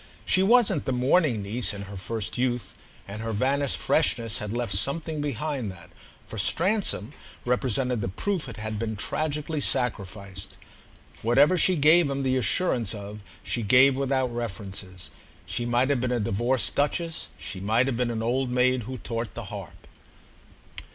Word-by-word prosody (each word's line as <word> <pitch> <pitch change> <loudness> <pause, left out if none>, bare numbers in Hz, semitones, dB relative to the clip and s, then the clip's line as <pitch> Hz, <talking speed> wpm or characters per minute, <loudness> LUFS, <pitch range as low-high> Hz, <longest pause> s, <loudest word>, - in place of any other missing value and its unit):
She 185 - +3
wasn't, 200 - +4
the - - 0
mourning 125 - +2
niece, 110 +2 0
in 100 - -6
her 100 0 -9
first 105 +2 -4
youth, 125 -3 -1 0.3
and 105 +2 -6
her 115 0 -3
vanished 135 +5 +1
freshness 115 -7 +1
had 105 -1 -4
left 120 -3 -2
something 150 - 0
behind 140 -4 -2
that, 90 -2 -14 0.3
for - - -7
Stransom, 180 - 0 0.3
represented 125 -1 +1
the - - -1
proof 175 - -2
it 115 - -9
had 110 0 -4
been 110 -1 -2
tragically 150 +6 -2
sacrificed. 100 -7 -2 0.6
Whatever 135 +9 +5
she 185 +1 +3
gave 155 +1 +5
him 140 0 -2
the 130 -1 +1
assurance 120 - +1
of 105 +1 -8 0.2
she 120 - -2
gave 130 +5 +6
without 130 -2 0
references. 95 -5 -5 0.3
She 120 - -2
might 120 +3 +2
have 135 -4 +1
been 125 0 0
a 125 - +1
divorced 120 +5 0
duchess—she 150 - -2
might 110 +6 +2
have 135 -2 -1
been 125 -1 0
an 110 -1 -2
old 125 +2 0
maid 125 0 +2
who 130 - -4
taught 115 -2 -4
the - - -6
harp. - - -9
125 Hz, 160 wpm, -26 LUFS, 110-140 Hz, 0.6 s, gave